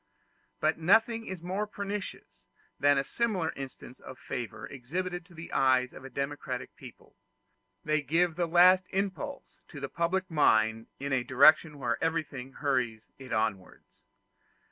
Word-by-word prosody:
But 155 Hz, 0 st, +1 dB
nothing 225 Hz, +6 st, +3 dB
is 185 Hz, -3 st, -6 dB
more 190 Hz, +4 st, -2 dB
pernicious 200 Hz, -, -6 dB, 0.3 s
than 145 Hz, -1 st, +4 dB
similar 190 Hz, -1 st, -1 dB
instances 135 Hz, -1 st, -9 dB
of 130 Hz, -, -10 dB
favor 120 Hz, -4 st, -6 dB
exhibited 175 Hz, +7 st, -4 dB
to 175 Hz, -, -17 dB
the 165 Hz, +1 st, -9 dB
eyes 130 Hz, -1 st, +3 dB
of -, -, -11 dB
a 135 Hz, -, -8 dB
democratic 140 Hz, +3 st, -4 dB
people: -, -, -14 dB, 0.7 s
they 155 Hz, 0 st, +2 dB
give 165 Hz, +3 st, +1 dB
the 175 Hz, -1 st, 0 dB
last 180 Hz, +2 st, +6 dB
impulse 200 Hz, +9 st, -4 dB
to 145 Hz, -, -10 dB
the 135 Hz, -1 st, -4 dB
public 185 Hz, +2 st, -1 dB
mind 110 Hz, -7 st, +3 dB
in 140 Hz, 0 st, -3 dB
a 130 Hz, -2 st, +1 dB
direction 145 Hz, +4 st, +5 dB
where 140 Hz, -, -2 dB
everything 150 Hz, -5 st, -2 dB
hurries 125 Hz, -7 st, -1 dB
it 130 Hz, -2 st, -10 dB
onwards. 110 Hz, -4 st, -3 dB
155 Hz, 145 wpm, -29 LUFS, 130-180 Hz, 0.7 s, last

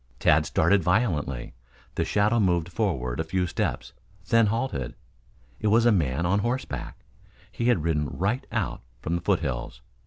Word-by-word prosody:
Tad -, -, +3 dB
started 100 Hz, -1 st, +3 dB
violently. 80 Hz, -, 0 dB, 0.4 s
The -, -, 0 dB
shadow 105 Hz, +3 st, +2 dB
moved 85 Hz, -4 st, +1 dB
forward 80 Hz, -, -1 dB
a -, -, +1 dB
few 90 Hz, +3 st, -1 dB
steps, 85 Hz, -, -3 dB, 0.4 s
then 115 Hz, -2 st, +5 dB
halted. 110 Hz, -, -2 dB, 0.6 s
It 110 Hz, -, -1 dB
was 115 Hz, +3 st, +4 dB
a 120 Hz, -, +6 dB
man 80 Hz, -5 st, +1 dB
on 100 Hz, +4 st, +2 dB
horseback. 120 Hz, +5 st, -3 dB, 0.5 s
He 120 Hz, -, -3 dB
had 120 Hz, -10 st, +3 dB
ridden 75 Hz, -3 st, 0 dB
right 105 Hz, +8 st, -2 dB
out -, -, -2 dB, 0.2 s
from 80 Hz, +7 st, -3 dB
the 85 Hz, -, -2 dB
foothills. 65 Hz, -10 st, -2 dB
90 Hz, 155 wpm, -26 LUFS, 75-110 Hz, 0.6 s, a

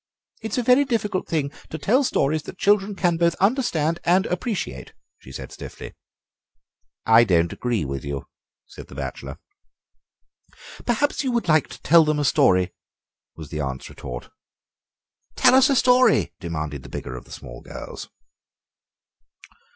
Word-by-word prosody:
"It's 220 Hz, 0 st, -4 dB
a 250 Hz, -, +1 dB
very 250 Hz, +4 st, +5 dB
difficult 215 Hz, -7 st, -2 dB
thing 150 Hz, -4 st, -1 dB, 0.2 s
to 160 Hz, -, -5 dB
tell 225 Hz, -, +2 dB
stories 155 Hz, -, +1 dB
that 180 Hz, -, -10 dB
children 205 Hz, 0 st, +2 dB
can 175 Hz, -3 st, +1 dB
both 170 Hz, 0 st, +2 dB
understand 180 Hz, -, +1 dB
and 185 Hz, +3 st, +3 dB
appreciate," 195 Hz, +3 st, -4 dB, 0.3 s
she 65 Hz, -, -14 dB
said 65 Hz, -, -8 dB
stiffly. -, -, -9 dB, 1.1 s
"I 115 Hz, +1 st, +7 dB
don't 85 Hz, -6 st, +2 dB
agree 120 Hz, -9 st, -1 dB
with 70 Hz, -1 st, -5 dB
you," 70 Hz, -1 st, -5 dB, 0.4 s
said -, -, -12 dB
the -, -, -13 dB
bachelor. 65 Hz, -2 st, -6 dB, 1.5 s
"Perhaps 290 Hz, +5 st, +1 dB
you 260 Hz, -, 0 dB
would 235 Hz, -5 st, -1 dB
like 155 Hz, -2 st, +3 dB
to -, -, -12 dB
tell 165 Hz, +2 st, +6 dB
them 155 Hz, -1 st, 0 dB
a 145 Hz, -, 0 dB
story," 95 Hz, -, +3 dB, 0.6 s
was 80 Hz, -3 st, -10 dB
the 75 Hz, -, -4 dB
aunt's 65 Hz, -2 st, -5 dB
retort. -, -, -8 dB, 1.0 s
"Tell -, -, +5 dB
us 265 Hz, +1 st, +6 dB
a 275 Hz, -, +3 dB
story," 250 Hz, 0 st, +4 dB
demanded 75 Hz, -5 st, -4 dB
the -, -, -12 dB
bigger 65 Hz, -, -6 dB
of 65 Hz, -, -9 dB
the -, -, -18 dB
small -, -, -10 dB
girls. -, -, -9 dB
160 Hz, 150 wpm, -23 LUFS, -, 1.5 s, I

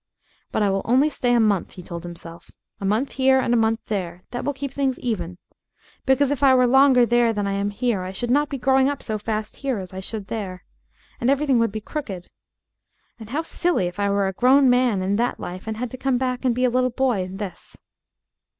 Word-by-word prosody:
"But -, -, 0 dB
I 200 Hz, -, +2 dB
will 195 Hz, 0 st, 0 dB
only 265 Hz, +6 st, +3 dB
stay 245 Hz, -3 st, 0 dB
a -, -, +4 dB
month," 210 Hz, -5 st, +1 dB
he 180 Hz, -, -10 dB
told 170 Hz, 0 st, -7 dB
himself, 170 Hz, -1 st, -10 dB, 0.3 s
"a 195 Hz, -, -4 dB
month 220 Hz, +8 st, 0 dB
here 265 Hz, 0 st, +3 dB
and 240 Hz, -2 st, +1 dB
a -, -, +4 dB
month 225 Hz, 0 st, +1 dB
there, 180 Hz, -4 st, -4 dB
that 245 Hz, -, -4 dB
will 285 Hz, -, 0 dB
keep 280 Hz, -1 st, -6 dB
things 270 Hz, -2 st, 0 dB
even. 180 Hz, -7 st, -3 dB, 0.7 s
Because 265 Hz, +1 st, +3 dB
if 285 Hz, -2 st, -2 dB
I 270 Hz, -2 st, +6 dB
were 255 Hz, -1 st, +4 dB
longer 260 Hz, 0 st, +5 dB
there 235 Hz, 0 st, +3 dB
than 205 Hz, -2 st, -2 dB
I 200 Hz, -, -1 dB
am 200 Hz, +1 st, -1 dB
here 210 Hz, -1 st, -1 dB
I 185 Hz, -, -5 dB
should 235 Hz, +6 st, -3 dB
not 290 Hz, +2 st, +2 dB
be 275 Hz, -, -3 dB
growing 265 Hz, +1 st, +3 dB
up 285 Hz, -1 st, -4 dB
so 215 Hz, -2 st, -3 dB
fast 215 Hz, 0 st, -4 dB
here 270 Hz, -4 st, -2 dB
as 185 Hz, -1 st, -7 dB
I 190 Hz, -, -5 dB
should 205 Hz, +1 st, -4 dB
there. 190 Hz, -4 st, -5 dB, 0.6 s
And 240 Hz, -, +1 dB
everything 275 Hz, -2 st, +2 dB
would 230 Hz, -2 st, +1 dB
be 215 Hz, +1 st, -5 dB
crooked. 205 Hz, -, -6 dB, 0.9 s
And 220 Hz, -1 st, -10 dB
how 295 Hz, +6 st, -2 dB
silly 340 Hz, -, 0 dB
if 175 Hz, +2 st, -5 dB
I 200 Hz, 0 st, +1 dB
were 200 Hz, 0 st, +1 dB
a 190 Hz, -, -3 dB
grown 260 Hz, +5 st, +5 dB
man 245 Hz, -6 st, +2 dB
in 195 Hz, +2 st, 0 dB
that 240 Hz, +2 st, -1 dB
life 185 Hz, +4 st, -7 dB
and 220 Hz, -1 st, -3 dB
had 245 Hz, 0 st, -4 dB
to 255 Hz, -, -7 dB
come 265 Hz, -1 st, 0 dB
back 255 Hz, 0 st, -2 dB
and 245 Hz, -2 st, +2 dB
be 250 Hz, +1 st, +2 dB
a 250 Hz, -, +2 dB
little 255 Hz, +1 st, +2 dB
boy 250 Hz, -4 st, 0 dB
in 185 Hz, +1 st, -6 dB
this!" 200 Hz, -4 st, -8 dB
235 Hz, 240 wpm, -23 LUFS, 200-260 Hz, 0.9 s, I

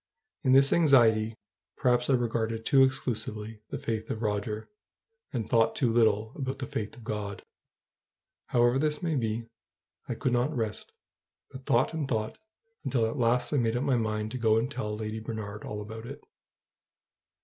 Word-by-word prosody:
In 130 Hz, -, +4 dB
this 135 Hz, +1 st, +6 dB
anxiety 115 Hz, -8 st, +4 dB, 0.4 s
perhaps 125 Hz, 0 st, +2 dB
I -, -, +5 dB
regarded 115 Hz, -2 st, 0 dB
too 135 Hz, -2 st, +5 dB
exclusively 110 Hz, -4 st, -2 dB
the -, -, -3 dB
faith 110 Hz, -1 st, -3 dB
of 110 Hz, -, -3 dB
Roger, 105 Hz, +1 st, -2 dB, 0.6 s
and 110 Hz, -4 st, -2 dB
thought 115 Hz, -1 st, +3 dB
too 120 Hz, -4 st, +1 dB
little 110 Hz, -1 st, +3 dB
about 130 Hz, -1 st, -3 dB
the 135 Hz, -, -4 dB
faith 110 Hz, +3 st, -4 dB
of 120 Hz, -, -12 dB
God. 105 Hz, -2 st, -4 dB, 1.0 s
However 120 Hz, +2 st, +3 dB
this 150 Hz, +2 st, 0 dB
may 165 Hz, -2 st, 0 dB
be, 115 Hz, -4 st, -1 dB, 0.6 s
I -, -, -1 dB
could 130 Hz, -, -1 dB
not 125 Hz, +5 st, +1 dB
rest, 110 Hz, -2 st, -3 dB, 0.6 s
but 130 Hz, 0 st, -11 dB
thought 120 Hz, +7 st, +3 dB
and 155 Hz, -4 st, -2 dB
thought, 110 Hz, -, -2 dB, 0.4 s
until 120 Hz, -4 st, +1 dB
at 110 Hz, -, -2 dB
last 120 Hz, +1 st, +2 dB
I -, -, +3 dB
made 115 Hz, -2 st, +1 dB
up 125 Hz, -, -1 dB
my 140 Hz, -3 st, +2 dB
mind 110 Hz, -2 st, -1 dB
to 130 Hz, -, -4 dB
go 110 Hz, -1 st, +4 dB
and 120 Hz, +4 st, 0 dB
tell 105 Hz, -5 st, -3 dB
Lady 110 Hz, 0 st, -4 dB
Bernard 110 Hz, -2 st, -6 dB
all 105 Hz, 0 st, -5 dB
about 110 Hz, +2 st, -8 dB
it. 140 Hz, -, -8 dB
115 Hz, 170 wpm, -29 LUFS, 110-130 Hz, 1.0 s, this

